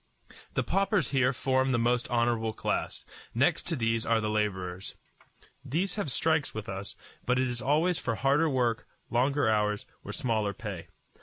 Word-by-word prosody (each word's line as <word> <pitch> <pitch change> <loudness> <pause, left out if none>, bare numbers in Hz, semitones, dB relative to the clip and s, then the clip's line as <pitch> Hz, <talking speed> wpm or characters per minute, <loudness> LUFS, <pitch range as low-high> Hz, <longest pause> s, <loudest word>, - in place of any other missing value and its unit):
The - - +2
paupers 195 +1 +1
here 130 -2 +3
form 130 0 +1
the 120 - +2
most 120 +1 +1
honorable 115 -2 +1
class. - - -2 0.3
Next - - +2
to 170 - 0
these 115 -3 0
are 115 -1 +2
the 105 -1 -1
laborers. 95 -4 -2 0.7
These 180 +7 -1
have 205 -8 -2
strikes 155 +3 +2
as - - -17
with 110 -1 -5
us; 95 +1 -5 0.3
but 125 0 +3
it 130 0 +2
is 120 0 -3
always 155 +6 +2
for 115 -4 -1
harder 140 +8 +3
work, 120 -4 0 0.2
longer 135 +3 +2
hours, 105 -1 +1 0.2
or - - -6
smaller 110 -4 0
pay. 100 -6 -6
120 Hz, 170 wpm, -29 LUFS, 110-135 Hz, 0.7 s, here